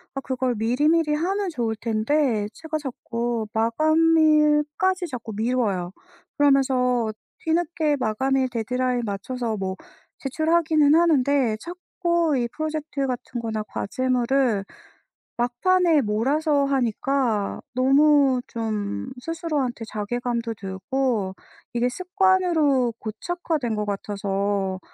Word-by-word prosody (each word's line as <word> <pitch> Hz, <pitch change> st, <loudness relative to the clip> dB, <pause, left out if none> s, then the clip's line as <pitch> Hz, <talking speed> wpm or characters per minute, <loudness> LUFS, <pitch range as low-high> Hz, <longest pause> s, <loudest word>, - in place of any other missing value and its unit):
아 -, -, -1 dB
그걸 255 Hz, -2 st, -1 dB
미리미리 300 Hz, +8 st, +2 dB
하면 380 Hz, +4 st, -1 dB
좋을 235 Hz, -7 st, -2 dB
텐데 225 Hz, 0 st, 0 dB
제가 320 Hz, -1 st, -4 dB
자꾸 235 Hz, -4 st, -3 dB
마감일까지 310 Hz, -, +3 dB
자꾸 240 Hz, -6 st, -6 dB
미뤄요. 215 Hz, -6 st, 0 dB, 0.5 s
그러면서 255 Hz, -5 st, +3 dB, 0.3 s
뒤늦게 320 Hz, -2 st, +1 dB
마감일 260 Hz, +4 st, +1 dB
데드라인 250 Hz, +1 st, -1 dB
맞춰서 225 Hz, +3 st, -3 dB
뭐 190 Hz, -1 st, -3 dB, 0.4 s
제출하기는 315 Hz, +1 st, +2 dB
하는데 280 Hz, -7 st, +3 dB
자꾸 345 Hz, -3 st, -1 dB
이 240 Hz, -1 st, 0 dB
프로젝트 310 Hz, -1 st, -3 dB
같은 250 Hz, -1 st, -4 dB
거나 220 Hz, -2 st, -3 dB
과제물을 245 Hz, 0 st, 0 dB, 0.7 s
막판에 320 Hz, +7 st, +3 dB
몰아서 280 Hz, +7 st, +1 dB
하니까 250 Hz, -4 st, 0 dB
너무 275 Hz, 0 st, +4 dB
좀 210 Hz, -, -3 dB
스스로한테 295 Hz, -7 st, -2 dB
자괴감도 230 Hz, +2 st, -3 dB
들고 205 Hz, +1 st, -2 dB, 0.4 s
이게 240 Hz, +1 st, +1 dB
습관으로 350 Hz, -, +2 dB
고착화된 280 Hz, -, -3 dB
것 210 Hz, 0 st, -2 dB
같아서 200 Hz, -1 st, -2 dB
255 Hz, 255 characters per minute, -24 LUFS, 225-305 Hz, 0.7 s, 너무